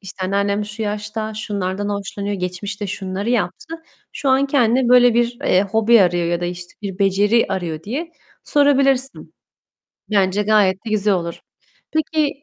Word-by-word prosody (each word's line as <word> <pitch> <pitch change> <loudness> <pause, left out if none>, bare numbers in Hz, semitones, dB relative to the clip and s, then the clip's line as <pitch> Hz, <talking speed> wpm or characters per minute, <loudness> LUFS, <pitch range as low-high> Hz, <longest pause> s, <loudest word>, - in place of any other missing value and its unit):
işte, 195 -1 -7
anneannem 200 +2 0
şu 210 +2 -6
yaşta 210 +1 -4
şunlardan 205 -1 -3
hoşlanıyor, 200 0 -4
geçmişte 195 +3 -4
şunları 195 +3 -4
yaptı, 240 - -2 0.4
şu 275 - -3
an 265 +1 +3
kendine 255 -2 +2
böyle 245 -1 +6
bir, 240 0 +1
eee, 185 - +3
hobi 220 +2 +4
arıyor 175 -1 +1
ya 170 0 -1
da 175 - -2
işte 175 0 -6
bir 195 -1 -5
beceri 200 +4 +3
arıyor 170 -5 -3
diye 300 - -5 0.3
sorabilirsin. 275 -2 +1 0.8
Bence 200 0 +2
gayet 205 -3 +3
de - - -4
güzel 210 -1 +2
olur. 170 -2 -4 0.5
Peki 310 -2 -1
205 Hz, 150 wpm, -20 LUFS, 190-240 Hz, 0.8 s, böyle